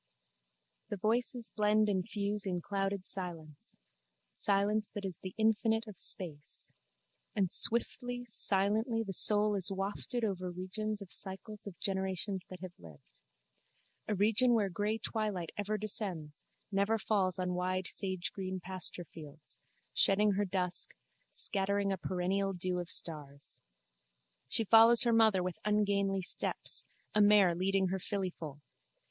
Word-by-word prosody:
The 205 Hz, -, -3 dB
voices 235 Hz, +3 st, 0 dB
blend 215 Hz, 0 st, +3 dB
and 190 Hz, -3 st, 0 dB
fuse 205 Hz, -1 st, 0 dB
in 180 Hz, -2 st, -1 dB
clouded 195 Hz, +1 st, -3 dB
silence: 165 Hz, -6 st, -7 dB, 0.6 s
silence 205 Hz, +1 st, 0 dB
that 205 Hz, -1 st, -4 dB
is 185 Hz, -4 st, -5 dB
the 185 Hz, -1 st, -8 dB
infinite 225 Hz, +1 st, +2 dB
of 210 Hz, -3 st, -10 dB
space: 155 Hz, -7 st, -1 dB, 0.6 s
and 190 Hz, -4 st, +1 dB
swiftly, 245 Hz, +1 st, +2 dB
silently 215 Hz, +2 st, 0 dB
the 195 Hz, -3 st, -6 dB
soul 210 Hz, +3 st, +5 dB
is 195 Hz, -2 st, +2 dB
wafted 200 Hz, +5 st, -3 dB
over 185 Hz, -3 st, -3 dB
regions 205 Hz, +4 st, -4 dB
of 185 Hz, -, -14 dB
cycles 205 Hz, +2 st, -4 dB
of 190 Hz, -, -9 dB
generations 190 Hz, 0 st, -1 dB
that 185 Hz, -1 st, -10 dB
have 185 Hz, -2 st, -7 dB
lived. 80 Hz, -4 st, -16 dB, 0.9 s
A 210 Hz, -, 0 dB
region 220 Hz, +5 st, +3 dB
where 205 Hz, -3 st, +1 dB
grey 205 Hz, +5 st, -1 dB
twilight 210 Hz, -7 st, -3 dB
ever 205 Hz, +1 st, -2 dB
descends, 185 Hz, -8 st, -4 dB, 0.3 s
never 200 Hz, +3 st, +1 dB
falls 195 Hz, -4 st, +1 dB
on 180 Hz, -1 st, -2 dB
wide 185 Hz, +1 st, -1 dB
sagegreen 185 Hz, 0 st, -2 dB
pasturefields, 170 Hz, -5 st, -5 dB, 0.3 s
shedding 205 Hz, +2 st, +4 dB
her 200 Hz, +1 st, 0 dB
dusk, 180 Hz, -2 st, -3 dB, 0.3 s
scattering 200 Hz, 0 st, +1 dB
a -, -, -3 dB
perennial 190 Hz, +2 st, -1 dB
dew 180 Hz, 0 st, -2 dB
of 175 Hz, 0 st, -5 dB
stars. 145 Hz, -5 st, -2 dB, 0.9 s
She 225 Hz, -, -1 dB
follows 225 Hz, +3 st, +7 dB
her 235 Hz, -1 st, +2 dB
mother 220 Hz, -5 st, +4 dB
with 180 Hz, -2 st, -4 dB
ungainly 200 Hz, -2 st, +1 dB
steps, -, -, +1 dB, 0.3 s
a 210 Hz, -, +4 dB
mare 205 Hz, -3 st, +6 dB
leading 190 Hz, +2 st, +1 dB
her 190 Hz, +1 st, -2 dB
fillyfoal. 175 Hz, -7 st, -5 dB
195 Hz, 135 wpm, -33 LUFS, 185-210 Hz, 0.9 s, follows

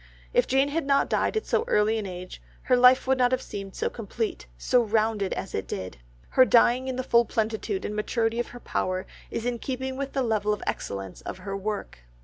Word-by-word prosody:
If -, -, +3 dB
Jane 270 Hz, +2 st, +3 dB
had 305 Hz, 0 st, -2 dB
not 275 Hz, 0 st, +3 dB
died -, -, +1 dB
at 435 Hz, -, -2 dB
so -, -, +1 dB
early 215 Hz, -, +2 dB
an 205 Hz, -, -4 dB
age, 180 Hz, 0 st, -8 dB, 0.2 s
her 255 Hz, -, +3 dB
life 250 Hz, +1 st, +6 dB
would 265 Hz, 0 st, +2 dB
not 250 Hz, 0 st, +4 dB
have 255 Hz, 0 st, +1 dB
seemed 195 Hz, -1 st, -7 dB
so -, -, -1 dB
complete, 220 Hz, -, -4 dB
so 245 Hz, -, +3 dB
rounded 215 Hz, -2 st, +1 dB
as 195 Hz, -, -5 dB
it 95 Hz, -, -3 dB
did. 95 Hz, -6 st, -5 dB, 0.3 s
Her 260 Hz, -, +6 dB
dying 245 Hz, +1 st, +4 dB
in 260 Hz, -, -2 dB
the 255 Hz, -, -2 dB
full 235 Hz, -1 st, +4 dB
plenitude 220 Hz, -3 st, -2 dB
and 210 Hz, -, -3 dB
maturity 225 Hz, +2 st, 0 dB
of 240 Hz, -, -1 dB, 0.2 s
power 185 Hz, 0 st, -1 dB, 0.2 s
is 230 Hz, -, -4 dB
in 245 Hz, -1 st, -1 dB
keeping 260 Hz, +1 st, -4 dB
with 275 Hz, 0 st, -4 dB
the 270 Hz, -, +1 dB
level 210 Hz, -3 st, 0 dB
excellence 95 Hz, -2 st, -4 dB
of -, -, -6 dB
her 195 Hz, +1 st, -5 dB
work. 205 Hz, -, -4 dB
225 Hz, 210 wpm, -26 LUFS, 200-255 Hz, 0.3 s, life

